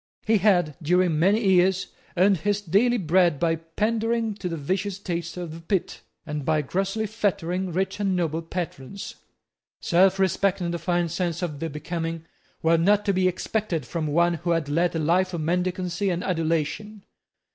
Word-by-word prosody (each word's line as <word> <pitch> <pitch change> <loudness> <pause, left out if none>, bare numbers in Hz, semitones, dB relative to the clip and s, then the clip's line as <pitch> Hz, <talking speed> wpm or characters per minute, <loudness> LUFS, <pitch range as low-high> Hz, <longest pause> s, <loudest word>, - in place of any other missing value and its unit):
He 220 -1 +3
had, 175 -7 +3
during 175 0 +2
many 200 +7 +3
years, 190 +1 +3 0.3
earned 190 +2 +4
his 205 +5 0
daily 205 +6 +2
bread 175 -4 +2
by 165 -1 +1 0.2
pandaring 225 +1 0
to 180 - -3
the 165 - -3
vicious 190 +6 -2
taste 175 -3 -4
of 175 -3 -5
the 165 - -8
pit, 185 +2 -2 0.2
and 150 -2 -4
by 155 +1 +1
grossly 195 +8 -1
flattering 190 -4 -1
rich 190 +3 -2
and 195 -2 +1
noble 165 -2 -1
patrons. 165 0 -6 0.7
Selfrespect 190 +1 +2
and 170 -1 -2
a 170 - -3
fine 175 -1 0
sense 175 0 -2
of 150 -5 -3
the 165 - -3
becoming 165 +2 -4 0.4
were 165 0 +4
not 205 +4 +3
to 200 - +2
be 185 0 +2
expected 185 - -2
from 160 +4 -3
one 170 +3 +3
who 170 +1 -4
had 165 -3 +1
led 170 +4 +1
a - - +1
life 175 +4 +1
of 165 - -3
mendicancy 180 +3 -1
and 175 0 -1
adulation. 170 +5 -2
180 Hz, 170 wpm, -25 LUFS, 165-195 Hz, 0.7 s, earned